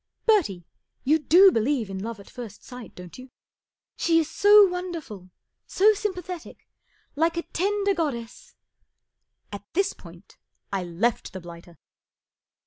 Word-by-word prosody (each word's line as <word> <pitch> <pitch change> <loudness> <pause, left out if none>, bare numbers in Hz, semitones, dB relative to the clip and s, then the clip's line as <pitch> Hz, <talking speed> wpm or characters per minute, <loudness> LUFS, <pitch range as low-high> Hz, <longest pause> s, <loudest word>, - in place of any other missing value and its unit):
Bertie, 305 - +2 0.4
you 305 +4 +3
do 365 +6 +6
believe 235 - 0
in 195 -1 -6
love 230 -1 -6
at 200 - -14
first 230 -5 -10
sight, 250 -2 -11
don't 180 +5 -11
you? 255 +1 -12 0.7
She 330 -1 +2
is 320 -2 +2
so 410 +5 +6
wonderful, 335 - -6 0.4
s - - -9
o 425 +3 +7
sympa¬ 395 -3 -3
thetic. 355 -3 -8 0.6
Like 330 +3 +1
a 340 - -1
tender 400 +2 0
god¬ 325 -6 -1
dess 235 - -11 0.5
" - - -50
At 205 - -7
this 385 +3 +1
point 170 +2 -16 0.4
I 195 -2 -1
left 180 +8 -2
the 190 - -6
blighter. 170 -1 -13
290 Hz, 150 wpm, -25 LUFS, -, 0.7 s, o